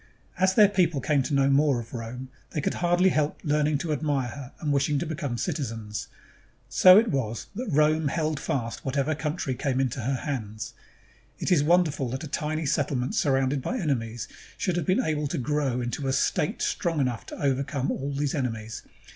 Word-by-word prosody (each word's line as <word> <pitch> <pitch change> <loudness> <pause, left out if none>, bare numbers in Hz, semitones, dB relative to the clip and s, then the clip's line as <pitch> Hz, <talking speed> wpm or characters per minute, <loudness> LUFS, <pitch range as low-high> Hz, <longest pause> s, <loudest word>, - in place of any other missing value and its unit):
As 190 0 +3
their 210 -2 +8
people 180 -7 +1
came 140 +1 +2
to 130 +2 -3
know 135 0 +4
more 140 -2 +3
of 115 -1 -9
Rome, 125 +2 -6 0.2
they - - -3
could 145 - 0
hardly 175 +2 +3
help 150 -3 0
learning 150 0 +2
to 155 +2 -2
admire 145 -4 0
her 135 +1 -8
and 150 -2 0
wishing 140 +1 +2
to 165 - -1
become 145 -6 -3
citizens. 115 -7 -3 0.6
So 185 0 +8
it 225 +1 +4
was 115 -5 -2
that 235 +2 -4
Rome 155 0 +3
held 155 0 -1
fast 115 -4 -3
whatever 140 +3 0
country 150 -2 -2
came 130 +1 -1
into 130 -1 0
her 130 +3 -1
hands. 110 -6 -4 0.6
It - - -2
is 160 -5 +5
wonderful 155 -5 +2
that 130 +6 -4
a - - -5
tiny 155 +2 -2
settlement 140 -3 0
surrounded 135 -1 +1
by 250 - -2
enemies 120 - -2 0.3
should 180 -3 0
have 175 -4 -2
been 185 - +3
able 150 -2 0
to 155 - -3
grow 135 -2 0
into 120 +3 -3
a 135 - +1
state 150 +3 0
strong 165 -3 0
enough 125 -4 -1
to - - -8
overcome 135 -1 0
all 140 +2 -3
these 140 0 -1
enemies. 115 -6 -3
145 Hz, 190 wpm, -26 LUFS, 130-155 Hz, 0.6 s, their